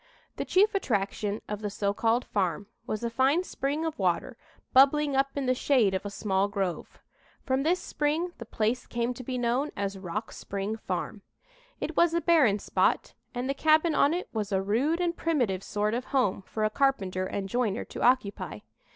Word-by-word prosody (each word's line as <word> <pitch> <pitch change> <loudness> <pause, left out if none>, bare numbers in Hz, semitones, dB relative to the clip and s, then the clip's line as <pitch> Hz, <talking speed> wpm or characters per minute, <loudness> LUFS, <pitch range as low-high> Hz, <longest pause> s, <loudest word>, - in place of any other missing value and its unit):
The - - -2
chief 410 +4 +3
attraction 210 - -1
of 210 0 -4
the 210 - -2
so 200 0 -1
called 230 +4 +1
farm 190 -1 -1 0.2
was 215 +1 -3
a 235 - 0
fine 270 +8 +3
spring 295 -1 -2
of 320 -7 -4
water 190 +7 0 0.4
bubbling 280 +2 +5
up 270 +1 +3
in 280 -2 -1
the 255 - +3
shade 250 -6 +2
of 190 +2 -2
a - - -4
small 200 -1 0
grove. 195 -3 -3 0.5
From 260 0 0
this 340 +5 +2
spring 310 +4 -1
the 235 - -7
place 225 +4 -1
came 240 +1 -1
to 255 - -9
be 255 +1 -3
known 245 +4 0
as 195 -1 -3
"Rock 190 +4 -4
Spring 200 +2 -4
Farm." 220 - -4 0.6
It - - -4
was 340 -1 +4
a 340 - +2
barren 300 - +4
spot - - 0 0.2
and 245 +1 -2
the 275 - +1
cabin 315 +3 +3
on 285 - +4
it 360 - -4
was 210 -3 -2
a 190 - +2
rude 240 - +1
and 345 -1 0
primitive 245 - 0
sort 210 +2 -1
of 250 +2 -2
home 250 -9 +1
for 215 - -3
a 215 - +2
carpenter 195 -9 +1
and 195 0 -3
joiner 235 -1 -1
to - - -8
occupy. 245 -5 +1
240 Hz, 195 wpm, -28 LUFS, 200-280 Hz, 0.6 s, bubbling